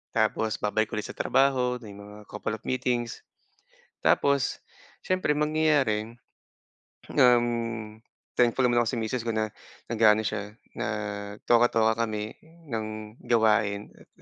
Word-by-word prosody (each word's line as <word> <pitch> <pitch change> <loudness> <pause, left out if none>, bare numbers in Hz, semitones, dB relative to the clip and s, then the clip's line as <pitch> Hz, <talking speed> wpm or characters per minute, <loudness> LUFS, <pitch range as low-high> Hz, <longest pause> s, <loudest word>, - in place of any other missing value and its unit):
Tapos, 110 -1 +1
babalik 110 +1 +1
ulit 105 - -2
sa - - -9
trabaho. 130 -2 +2
Na - - -11
may - - -11
mga 105 +1 -11
couple 105 +1 -3
of 110 - -13
meetings. 120 -2 -1 0.8
Tapos, 140 -2 +2 0.5
siyempre, 185 -4 +1
mangyayari, 150 -8 +1 1.0
um, 115 -3 +2 0.4
thankful 125 +1 +3
naman 120 -1 +3
ako - - -4
sa - - -3
miss 110 +2 -2
ko 115 - 0
na, 110 0 0 0.4
nag-a-ano 110 -1 +4
siya, 105 0 -4 0.2
na - - -2 0.6
toka-toka 115 -2 +4
kami 105 0 -4 0.4
ng 110 -1 -5 0.2
gawain 105 -3 +2
at - - -19
115 Hz, 125 wpm, -27 LUFS, 110-125 Hz, 1.0 s, nag-a-ano